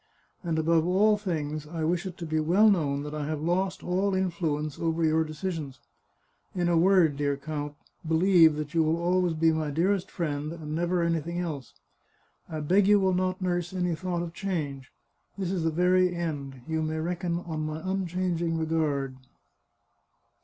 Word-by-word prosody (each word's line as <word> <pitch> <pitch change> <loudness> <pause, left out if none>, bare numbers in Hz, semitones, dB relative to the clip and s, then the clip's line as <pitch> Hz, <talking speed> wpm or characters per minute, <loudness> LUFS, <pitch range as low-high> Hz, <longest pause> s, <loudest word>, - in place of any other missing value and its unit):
And 165 -2 -1
above 160 0 +3
all 205 +4 +4
things, 155 -7 -3
I 160 0 -4
wish 175 +3 0
it 180 -1 -8
to 170 - -5
be 155 0 0
well 190 +8 +5
known 145 -6 0
that 150 0 -6
I 150 -1 -3
have 155 -1 -2
lost 185 +3 0
all 190 +2 0
influence 165 -5 -1
over 165 0 0
your 160 +1 +3
de 155 -1 -7
cisions. 155 -5 -4 0.8
In 175 -1 +1
a 175 - +3
word, 170 -4 +4
dear 145 -1 0
count, 145 0 -5 0.3
believe 165 -1 +5
that 150 0 -5
you 165 - +3
will 160 +1 +2
always 175 -1 +1
be 160 +1 +3
my 155 -1 -1
dearest 180 +6 0
friend, 150 -3 -3
and 155 -3 -6
never 175 +2 0
anything 170 0 -1
else. 155 -8 -4 0.7
I 155 -1 -4
beg 190 +6 +3
you 205 0 +6
will 190 -1 +2
not 185 +1 -1
nurse 175 -1 -1
any 180 -2 0
thought 175 0 -2
of 165 -1 -6
change; 150 -9 -4 0.5
this 190 -2 -2
is 180 -4 -1
the 165 - +2
very 180 +2 +3
end. 140 -6 -4
You 160 -1 -1
may 155 0 -2
reckon 170 +1 -2
on 160 -3 -4
my 155 0 -4
unchanging 180 -3 -1
regard." 150 -5 -1
165 Hz, 180 wpm, -27 LUFS, 155-180 Hz, 0.8 s, you